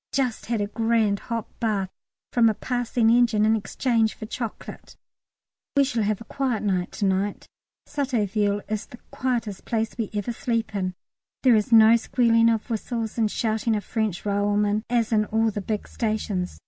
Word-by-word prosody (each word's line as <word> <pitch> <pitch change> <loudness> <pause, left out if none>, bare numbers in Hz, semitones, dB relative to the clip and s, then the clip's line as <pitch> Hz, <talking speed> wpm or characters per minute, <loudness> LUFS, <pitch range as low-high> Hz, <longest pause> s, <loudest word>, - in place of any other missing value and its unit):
Just 255 -4 -1
had 230 -2 0
a - - +1
grand 220 -1 +1
hot 230 -2 -4
bath 205 -5 -1 0.4
from 235 -2 +5
a 215 - -1
passing 245 -1 +1
engine 230 -3 +4
in 220 +1 +4
exchange 225 +1 0
for - - -7
chocolate. 230 0 -7 0.8
We 280 - +7
shall 260 -4 -1
have 210 -1 0
a - - -9
quiet 250 -2 -2
night 185 -3 0
to 205 - -1
night. 195 +1 0 0.4
Sotteville 210 -7 0
is 215 -1 -3
the 245 - -12
quietest 235 -6 -2
place 225 -1 -1
we 225 -4 -3
ever 205 +3 -2
sleep 230 -2 -2
in; 185 -2 -2 0.5
there 255 -3 +6
is 215 +1 0
no 225 0 +8
squealing 230 -1 +3
of 225 -2 0
whistles 230 0 -3
and 220 -2 +2
shouting 220 +1 0
of 210 - -2
French 215 -3 -2
railwaymen 205 +1 +1
as 235 -2 +1
in 215 -1 +3
all 225 +1 +1
the 205 - -4
big 210 +1 -3
stations. 215 -5 -2
220 Hz, 175 wpm, -25 LUFS, 205-235 Hz, 0.8 s, no